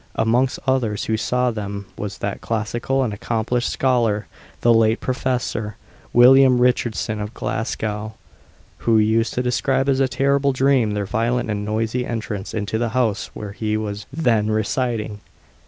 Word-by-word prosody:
Amongst 120 +4 +2
others 125 -6 0
who 110 - 0
saw 125 +3 0
them 100 -2 -5
was 100 -2 -5
that 100 -1 -4
classical 120 +4 -1
and 115 -5 -2
accomplished 115 +3 -1
scholar 115 -5 +1 0.4
the 120 - +5
late 115 0 +3
Professor 125 -4 -2 0.4
William 130 +1 +7
Richardson 120 -3 0
of 105 +3 -6
Glasgow, 110 -1 -3 0.6
who 115 -1 +3
used 110 +2 +2
to 125 - 0
describe 130 +2 +1
as 135 -1 +2
a 135 - +3
terrible 140 +1 +1
dream 130 -5 +2
their 105 -1 -1
violent 115 +1 0
and 105 0 -2
noisy 110 +3 -1
entrance 105 -5 -4
into 110 0 -2
the 120 -1 0
house 110 -5 0
where 105 -2 -6
he 105 +1 -2
was 105 -1 -5
then 120 -8 +1
residing. 110 0 -1
115 Hz, 150 wpm, -21 LUFS, 105-125 Hz, 0.6 s, William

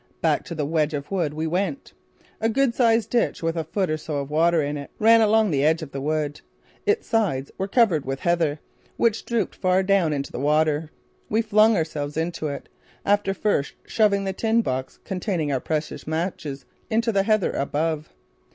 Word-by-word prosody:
Back - - +1
to 170 - -6
the 150 -2 -1
wedge 155 0 0
of 140 +4 -6
wood 165 -6 -1
we 160 +1 -2
went. 195 - -2 0.5
A 225 - +1
good 260 +1 +2
sized 230 -3 +2
ditch 235 -7 0
with 165 0 0
a 165 - -1
foot 190 +4 -1
or 155 -1 -1
so 155 -1 -4
of 140 0 -4
water 165 +2 +3
in 145 0 -1
it 140 -1 -6
ran 225 +1 +6
along 220 -2 +4
the 140 -2 +1
edge 160 +2 +2
of 145 - -9
the 135 - -5
wood. 150 0 -2 0.5
Its 425 +2 +2
sides 180 -12 0
were 190 - -1
covered 200 - +3
with 135 0 -4
heather, 165 -4 +1 0.4
which 230 -2 +1
drooped 230 -4 -1
far 185 0 +2
down 190 -4 +2
into 140 -2 -3
the - - -5
water. 150 +2 +1 0.4
We 220 +2 +2
flung 215 +1 +4
ourselves 150 -2 -3
into 165 -1 -2
it, 140 - -6 0.4
after 205 -1 +2
first 185 -8 0
shoving 205 -3 +2
the 190 -1 -2
tin 225 +3 +1
box 130 -3 -3
containing 180 -5 -2
our 135 - +1
precious 155 -1 -3
matches 160 -4 -3 0.2
into 230 +1 +1
the 200 -2 +2
heather 215 -1 +2
above. 155 +2 -2
165 Hz, 195 wpm, -24 LUFS, 150-210 Hz, 0.5 s, ran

